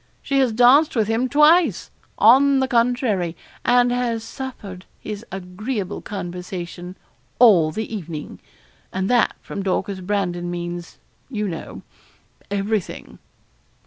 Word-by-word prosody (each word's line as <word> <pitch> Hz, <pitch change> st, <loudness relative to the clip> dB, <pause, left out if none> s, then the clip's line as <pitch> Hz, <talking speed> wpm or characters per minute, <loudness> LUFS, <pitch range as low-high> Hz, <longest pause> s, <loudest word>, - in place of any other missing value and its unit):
She 275 Hz, -1 st, +1 dB
has 260 Hz, -3 st, +3 dB
danced 250 Hz, +7 st, +5 dB
with 220 Hz, -3 st, +1 dB
him 230 Hz, +3 st, 0 dB
twice, 300 Hz, -, +4 dB, 0.3 s
on 270 Hz, +6 st, +6 dB
the 265 Hz, -, +1 dB
contrary, 230 Hz, -8 st, 0 dB, 0.3 s
and 245 Hz, 0 st, +4 dB
has 240 Hz, -2 st, -1 dB
suffered 225 Hz, -7 st, -8 dB
his 210 Hz, 0 st, -7 dB
agreeable 195 Hz, +3 st, -5 dB
conversation 180 Hz, -1 st, -7 dB, 0.4 s
all 195 Hz, -10 st, +6 dB
the 220 Hz, +6 st, -4 dB
evening; 165 Hz, -6 st, -7 dB, 0.5 s
and 190 Hz, +4 st, -2 dB
that 245 Hz, -1 st, +3 dB
from 200 Hz, -, -6 dB
Dorcas 195 Hz, 0 st, -2 dB
Brandon 180 Hz, -3 st, -2 dB
means, 175 Hz, 0 st, -6 dB, 0.3 s
you 210 Hz, -5 st, -2 dB
know, 165 Hz, -4 st, -7 dB, 0.7 s
everything.' 200 Hz, 0 st, -3 dB
210 Hz, 115 wpm, -21 LUFS, 180-245 Hz, 0.7 s, on